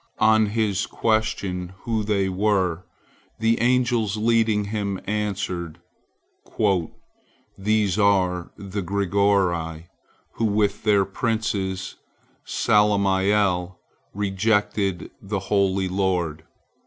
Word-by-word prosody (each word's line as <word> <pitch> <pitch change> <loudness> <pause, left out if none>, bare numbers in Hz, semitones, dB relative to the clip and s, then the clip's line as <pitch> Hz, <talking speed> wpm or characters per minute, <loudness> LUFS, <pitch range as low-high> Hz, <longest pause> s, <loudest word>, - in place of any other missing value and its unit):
On 110 0 +4
his 105 -2 0
question 100 -5 -1
who 110 -2 -1
they 100 -2 +1
were, 95 -3 0 0.5
the 115 +1 +1
angels 120 -4 +1
leading 110 -1 +2
him 100 -2 -3
answered, 95 -5 -3 1.8
"These 105 -1 +1
are 90 -4 +2
the 100 +1 -5
Grigori, 90 -4 0 0.5
who 115 - +1
with 105 -1 +1
their 100 -2 +4
prince 95 -3 -2 0.5
Salamiel 100 -3 +2 0.4
rejected 100 -2 0
the 100 0 -3
holy 95 -1 +1
Lord." 90 -4 -1
100 Hz, 85 wpm, -23 LUFS, 95-105 Hz, 1.8 s, On